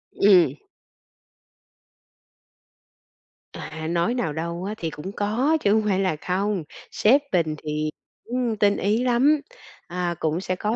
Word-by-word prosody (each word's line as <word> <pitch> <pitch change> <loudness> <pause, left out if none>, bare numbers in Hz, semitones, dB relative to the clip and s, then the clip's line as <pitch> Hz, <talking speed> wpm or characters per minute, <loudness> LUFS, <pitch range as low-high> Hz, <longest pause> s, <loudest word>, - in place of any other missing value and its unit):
Ừm. 190 -4 +5 3.0
À, 160 0 -6
nói 170 +7 +1
nào 205 -12 -1
đâu 170 +2 -4
á 210 - -3
thì 165 - -3
cũng 155 +6 -7
có 240 +11 +1
chứ 200 - +3
hông 220 0 +3
phải 195 -1 +2
là 185 -5 +1
không, 190 +3 -1 0.3
sếp 265 +7 +4
mình 160 -4 +1
thì 155 0 -2 0.4
cũng 240 -2 -1
tinh 205 -1 +3
ý 215 +5 +1
lắm, 265 +5 +3 0.5
à, 175 -1 -2
cũng 160 +2 -1
sẽ 185 -1 -2
có 210 +4 -1
195 Hz, 140 wpm, -24 LUFS, 170-220 Hz, 3.0 s, Ừm